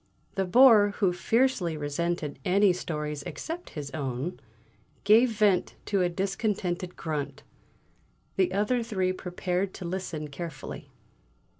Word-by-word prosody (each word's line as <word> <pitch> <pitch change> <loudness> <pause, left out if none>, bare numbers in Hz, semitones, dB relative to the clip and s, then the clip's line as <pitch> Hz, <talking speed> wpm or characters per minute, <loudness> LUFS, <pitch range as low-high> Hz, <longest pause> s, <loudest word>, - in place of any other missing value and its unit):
The 195 - 0
Bore, 210 -1 +6
who 190 -4 +2
fiercely 185 -3 +1
resented 150 0 -2
any 195 +1 +4
stories 150 -4 -4
except 330 - -6
his 140 -1 -5
own, 140 +3 -3 0.6
gave 225 +5 +6
vent 210 -4 +2
to 200 -2 +1
a 180 - +2
discontented 190 -1 -2
grunt; 145 -3 -4 0.9
the 185 -2 +2
other 210 +6 +1
three 190 -5 0
prepared 180 +1 -2
to 180 - -7
listen 170 -4 -4
carefully. 145 -1 -7
180 Hz, 120 wpm, -28 LUFS, 160-205 Hz, 0.9 s, Bore